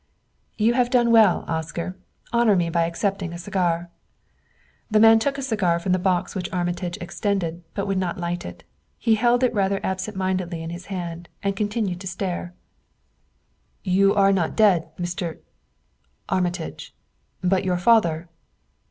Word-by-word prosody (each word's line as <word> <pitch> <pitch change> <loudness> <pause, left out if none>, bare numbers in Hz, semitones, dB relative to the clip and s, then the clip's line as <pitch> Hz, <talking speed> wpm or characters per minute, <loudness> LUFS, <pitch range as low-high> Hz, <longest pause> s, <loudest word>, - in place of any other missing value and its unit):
"Yon 225 +2 +3
have 245 -1 +2
done 240 -2 +3
well, 220 -6 +5
Oscar; 165 +3 -3 0.4
honor 235 -3 +4
me 170 -2 +1
by 170 0 +2
accepting 185 0 -2
a - - -5
cigar." 175 -2 -1 1.0
The 215 -1 +3
man 225 +1 +7
took 275 +4 -1
a 275 - -4
cigar 210 -9 +1
from 170 +2 -2
the 185 - +3
box 180 -1 0
which 180 -3 -4
Armitage 175 -1 -2
extended, 175 -2 -2
but 200 - -1
would 195 -2 0
not 185 +1 -2
light 175 0 -3
it. 85 0 -9 0.3
He 225 - +2
held 240 +3 +3
it 250 - +2
rather 195 -2 +1
absent 190 +2 -3
mindedly 185 -3 -2
in 165 - -5
his 175 +2 -8
hand 175 -3 -5
and 200 0 0
continued 205 -3 -2
to 190 - -6
stare. 180 -1 -4 1.3
"You 195 +1 +3
are 195 -1 +5
not 175 -4 0
dead, 195 -7 +4
Mr. 175 -1 -4 0.9
Armitage; 180 -3 -2 0.5
but 185 +1 +2
your 180 -1 0
father 175 -5 +3
185 Hz, 155 wpm, -23 LUFS, 175-205 Hz, 1.3 s, man